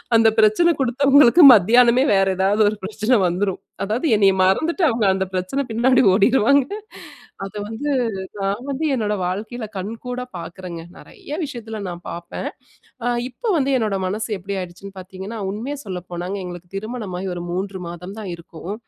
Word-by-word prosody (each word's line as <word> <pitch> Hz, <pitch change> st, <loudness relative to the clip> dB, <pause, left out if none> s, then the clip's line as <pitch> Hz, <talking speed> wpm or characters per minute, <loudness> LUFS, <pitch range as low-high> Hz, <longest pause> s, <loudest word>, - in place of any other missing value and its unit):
அந்த 225 Hz, 0 st, +6 dB
பிரச்சன 220 Hz, +11 st, +4 dB
குடுத்தவங்களுக்கு 275 Hz, +4 st, +5 dB
மத்தியானமே 240 Hz, +5 st, +5 dB
வேற 195 Hz, 0 st, +3 dB
ஏதாவது 195 Hz, +3 st, +2 dB
ஒரு 215 Hz, -, -4 dB
பிரச்சனைன 215 Hz, +5 st, +1 dB
வந்துரும் 185 Hz, +2 st, -1 dB, 0.2 s
அதாவது 220 Hz, +10 st, -1 dB
என்னைய 200 Hz, -2 st, +4 dB
மறந்துட்டு 315 Hz, -, +1 dB
அவுங்க 230 Hz, -3 st, 0 dB
அந்த 190 Hz, 0 st, -1 dB
பிரச்சன 185 Hz, +10 st, -1 dB
பின்னாடி 245 Hz, +3 st, +3 dB
ஓடிடுவாங்க 255 Hz, +6 st, +4 dB, 0.8 s
அத 195 Hz, -, -9 dB
வந்து 230 Hz, +7 st, -3 dB, 0.5 s
நான் 200 Hz, +5 st, -2 dB
வந்து 280 Hz, +3 st, -2 dB
என்னோட 210 Hz, -4 st, -1 dB
வாழ்க்கையில 215 Hz, +6 st, -4 dB
கண்கூடா 240 Hz, +6 st, -5 dB
பாக்குறேங்க. 170 Hz, 0 st, -8 dB, 0.2 s
நெறைய -, -, -14 dB
விஷயத்துல 230 Hz, -6 st, -6 dB
நான் 175 Hz, -1 st, -7 dB
பாப்பேன். 170 Hz, 0 st, -6 dB, 0.6 s
அ -, -, -1 dB, 0.2 s
இப்போ, 265 Hz, -, -7 dB
வந்து 275 Hz, -2 st, +1 dB
என்னோட 215 Hz, -4 st, -1 dB
மனசு 210 Hz, +4 st, -2 dB
எப்பிடி 195 Hz, +2 st, -5 dB
ஆயிடுச்சுன்னு 185 Hz, +2 st, -8 dB
பாத்தீங்கன்னா, 190 Hz, +4 st, -8 dB
உண்மைய 230 Hz, +9 st, -4 dB
சொல்ல 185 Hz, -3 st, -4 dB
போனாங்க, 175 Hz, +2 st, -4 dB
எங்களுக்கு 175 Hz, -1 st, -8 dB
திருமணமாகி 195 Hz, -3 st, -5 dB
ஒரு 175 Hz, -, -5 dB
3 190 Hz, +2 st, -3 dB
மாதம் 180 Hz, +3 st, -8 dB
தான் 205 Hz, -3 st, -6 dB
இருக்கும். 170 Hz, +2 st, -8 dB
210 Hz, 150 wpm, -21 LUFS, 185-245 Hz, 0.8 s, அந்த